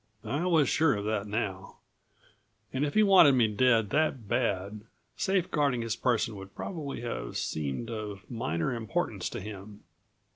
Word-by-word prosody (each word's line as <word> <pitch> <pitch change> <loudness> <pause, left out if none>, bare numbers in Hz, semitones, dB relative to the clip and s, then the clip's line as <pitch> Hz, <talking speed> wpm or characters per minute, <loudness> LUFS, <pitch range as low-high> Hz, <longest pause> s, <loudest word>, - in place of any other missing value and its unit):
I 150 +6 -1
was 160 -6 +4
sure 155 0 +3
of 100 0 -4
that 105 -1 -1
now. 100 -3 -3 1.0
And 135 +2 0
if 145 - -2
he 215 - +6
wanted 185 -8 +7
me 120 -3 +4
dead 110 -1 +2
that 145 -7 0
bad, 100 -3 -1 0.3
safe 190 -2 0
guarding 140 -6 +1
his 115 -1 -2
person 115 -3 0
would 95 0 -11
probably 150 -9 -5
have 120 -1 -4
seemed 80 - -3
of 105 -2 -6
minor 115 -3 -2
importance 110 -4 -2
to - - -5
him. 105 0 -9
115 Hz, 155 wpm, -29 LUFS, 105-140 Hz, 1.0 s, wanted